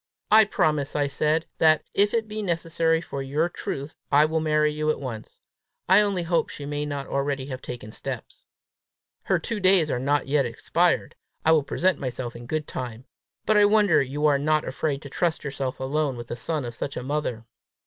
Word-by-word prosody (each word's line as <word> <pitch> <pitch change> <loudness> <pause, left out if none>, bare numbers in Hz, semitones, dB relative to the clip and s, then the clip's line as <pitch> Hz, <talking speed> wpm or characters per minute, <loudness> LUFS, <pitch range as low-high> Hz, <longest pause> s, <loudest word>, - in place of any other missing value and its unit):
"I 220 0 +8
promise," 150 -7 0
I 145 -1 +2
said, 150 +3 0
"that, 155 -1 +5
if 205 +1 +3
it 225 -1 0
be 215 0 -4
necessary 165 -3 +1
for 140 -4 -5
your 145 +5 0
truth, 145 -3 -5 0.2
I 145 +1 +6
will 160 +1 0
marry 150 -1 +2
you 155 0 -1
at 155 - 0
once. 120 -6 -7 0.5
I 190 +3 +7
only 200 -4 0
hope 170 0 +1
she 145 - -8
may 145 +1 -3
not 140 -1 -4
already 140 0 -2
have 130 -2 -6
taken 120 -3 -7
steps!" - - -7 0.8
"Her - - +2
two 230 -3 -4
days 185 -5 +4
are 125 - 0
not 145 +3 +1
yet 140 -2 +2
expired. 170 +9 0 0.3
I - - +4
shall 160 -2 +5
present 180 +4 0
myself 125 -2 -4
in 120 0 -9
good 155 +2 -2
time. 120 -1 -6 0.4
But 215 0 +3
I 205 - +7
wonder 205 -4 +4
you 140 +3 -2
are 145 -2 +4
not 155 +1 +1
afraid 140 +1 -2
to 140 - -8
trust 170 0 0
yourself 135 -2 -4
alone 135 0 -1
with 120 0 -8
the - - -3
son 140 +3 -2
of 120 - -5
such 135 +4 -5
a - - -4
mother!" 130 -5 -3
150 Hz, 200 wpm, -25 LUFS, 135-165 Hz, 0.8 s, I